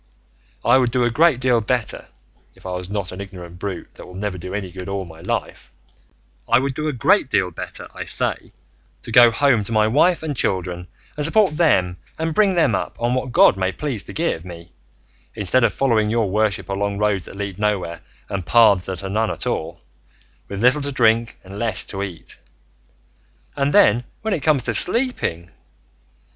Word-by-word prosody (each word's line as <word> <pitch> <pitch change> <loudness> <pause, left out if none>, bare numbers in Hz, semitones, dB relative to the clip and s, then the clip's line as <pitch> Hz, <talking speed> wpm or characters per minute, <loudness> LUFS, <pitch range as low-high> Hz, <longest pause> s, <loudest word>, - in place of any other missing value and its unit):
I 130 - +5
would 125 -2 +1
do 125 +1 0
a 120 - +1
great 155 0 +3
deal 125 -2 +2
better 120 +1 -2 0.5
(if - - -21
I 95 - -5
was 90 0 -5
not 100 -2 -3
an 90 - -7
ignorant 90 -3 -10
brute 95 -1 -6
that - - -12
will 90 - -12
never 95 -1 -4
do 90 +3 -6
any 95 -3 -5
good 95 +1 -8
all 95 -1 -3
my 80 -1 -13
life), - - -4 0.8
I 120 - +5
would 135 +1 -1
do 155 +3 -3
a - - 0
great 145 - +2
deal 95 -6 +1
better, - - -6
I - - -7
say, - - 0 0.5
to - - -7
go 120 +1 +7
home 120 -2 +2
to 100 - -6
my 110 -1 +3
wife 160 +9 +2
and 150 -3 -3
children 90 -5 -2 0.3
and 150 - -3
support 165 +1 +3
them 95 - +2 0.2
and 160 0 -2
bring 195 +1 +3
them 170 - +2
up - - -3
on 120 +1 0
what 130 0 -2
God 100 - +5
may 95 0 0
please 125 0 -4
to - - -10
give 160 - -2
me, 85 -1 -11 0.6
instead 105 +5 +1
of - - +3
following 115 -6 +1
your 110 -3 0
worship 105 -2 0
along 100 +1 -2
roads 105 -3 0
that - - -11
lead 100 -1 -5
nowhere 100 -5 -2 0.3
and 100 -2 -4
paths 100 -2 +4
that 95 0 -5
are 95 - -4
none 110 +1 0
at - - -4
all, - - -3 0.7
with 100 +2 -5
little 130 +4 +4
to 140 0 -1
drink 115 -3 +1
and 100 +2 -10
less 110 -5 +1
to 95 - -5
eat. 95 -4 -7 1.2
And 140 0 0
then 120 -2 +4 0.2
when 220 -2 -1
it 165 - -2
comes 140 -3 +2
to 120 - 0
sleeping! 180 - +3
110 Hz, 200 wpm, -20 LUFS, 95-130 Hz, 1.2 s, go